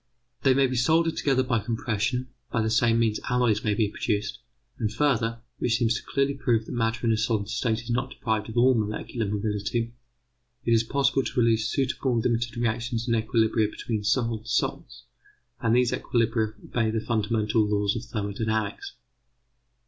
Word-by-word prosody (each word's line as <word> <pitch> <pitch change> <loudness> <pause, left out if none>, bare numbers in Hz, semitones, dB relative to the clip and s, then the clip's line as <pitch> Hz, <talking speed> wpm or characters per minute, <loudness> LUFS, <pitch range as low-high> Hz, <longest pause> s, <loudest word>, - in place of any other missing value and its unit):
They 135 -2 +4
may 135 0 +4
be 130 0 -1
soldered 160 +6 +3
together 135 -2 +2
by 120 -3 +1
compression; 115 +3 -2 0.2
by 115 - +1
the 110 - 0
same 115 0 +3
means 115 -2 +1
alloys 120 -4 +2
may 105 -2 +1
be 110 0 +2
produced; 105 0 -2 0.4
and 110 -2 0
further, 115 -2 +1 0.2
which 115 -1 +1
seems 115 -1 +2
to 120 - -3
clearly 140 0 0
prove 120 -5 0
that - - -8
matter 115 -1 -1
in 115 - +4
a - - +1
solid 110 -2 0
state 115 0 -1
is 120 - -5
not 120 +2 0
deprived 110 -4 -2
of 110 - -6
all 130 +2 +6
molecular 110 0 -2
mobility, 105 +3 -2 0.7
it 115 - +1
is 115 - +5
possible 135 +2 +1
to - - -2
realise 115 -2 +3
suitable 135 -2 0
limited 120 +1 0
reactions 115 +1 -1
and 115 - +2
equilibria 110 -1 +2
between 110 -1 -4
solid 115 0 0
salts, - - -2 0.6
and 115 -1 +2
these 125 -1 +3
equilibria 115 -2 0
obey 115 -2 0
the 110 0 0
fundamental 110 0 +1
laws 105 -1 +1
of 115 - -4
thermodynamics. 110 - -3
115 Hz, 170 wpm, -26 LUFS, 110-125 Hz, 0.7 s, all